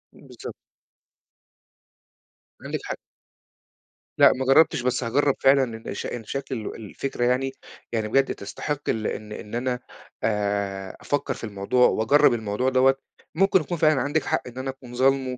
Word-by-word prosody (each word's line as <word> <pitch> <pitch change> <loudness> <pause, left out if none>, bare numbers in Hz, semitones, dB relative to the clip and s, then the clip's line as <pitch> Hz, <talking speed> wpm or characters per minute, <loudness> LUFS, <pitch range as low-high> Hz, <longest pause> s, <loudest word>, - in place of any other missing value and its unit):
إمم، - - -17
بالضبط. - - -9 2.1
عندِك - - -3
حق. - - -4 1.2
لأ، - - +8
ما 130 +1 -3
جَرّبتش 135 +5 +5
بس 125 +1 0
هاجرّب 135 +4 +2
فعلًا 135 0 +5
لإن 110 - -7
ش - - -5
إن 120 - -5
شكل 135 +3 -4
ال 110 -3 -5
الفكرة 120 +4 -4
يعني 130 +2 +1 0.4
يعني 110 -2 -1
بجد 135 +5 +2
تستحق 145 +8 -4
ال 110 -1 0
إن 105 0 -5
إن 105 +1 -7
أنا 125 0 -1 0.4
آآ 100 -2 -1
أفَكّر 145 - -1
في - - -11
الموضوع 110 +4 +2
وأجرّب 140 +6 +4
الموضوع 110 +2 0
دوّة، 130 +1 +4 0.4
مُمكن 190 +1 +4
يكون 175 +3 -4
فعلًا 155 -3 +3
عندِك 145 +1 0
حق - - 0
إن 125 0 -10
أنا 130 +1 -3
أكون 130 -2 -9
ظالمُه 130 0 +2
125 Hz, 155 wpm, -25 LUFS, 110-135 Hz, 2.1 s, لأ